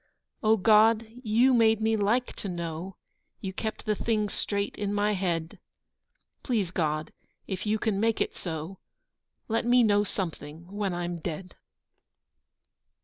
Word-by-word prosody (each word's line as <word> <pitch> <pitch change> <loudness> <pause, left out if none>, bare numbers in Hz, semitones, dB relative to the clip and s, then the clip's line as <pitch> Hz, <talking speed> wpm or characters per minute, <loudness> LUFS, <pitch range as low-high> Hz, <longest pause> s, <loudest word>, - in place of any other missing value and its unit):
O 220 0 +4
God, 220 +2 +5 0.2
you 240 +3 +4
made 225 -2 +4
me 220 0 +2
like 220 +4 +1
to 200 - -4
know, 170 +1 -5 0.4
You 190 -1 -5
kept 220 +3 -4
the 215 - +2
things 210 -1 -1
straight 200 0 -2
in 205 -1 -2
my 205 +1 +2
head, 170 -4 -2 0.8
Please 215 -9 0
God, 155 -3 -1 0.3
if 190 +1 -4
you 215 +1 +2
can 215 -2 0
make 225 +1 +1
it - - -1
so, 165 +2 -5 0.7
Let 225 0 0
me 245 +1 +5
know 205 -2 +4
something 165 -5 -5
when 200 -3 -2
I'm 175 0 -3
dead. 180 +4 -6
205 Hz, 145 wpm, -28 LUFS, 175-220 Hz, 0.8 s, God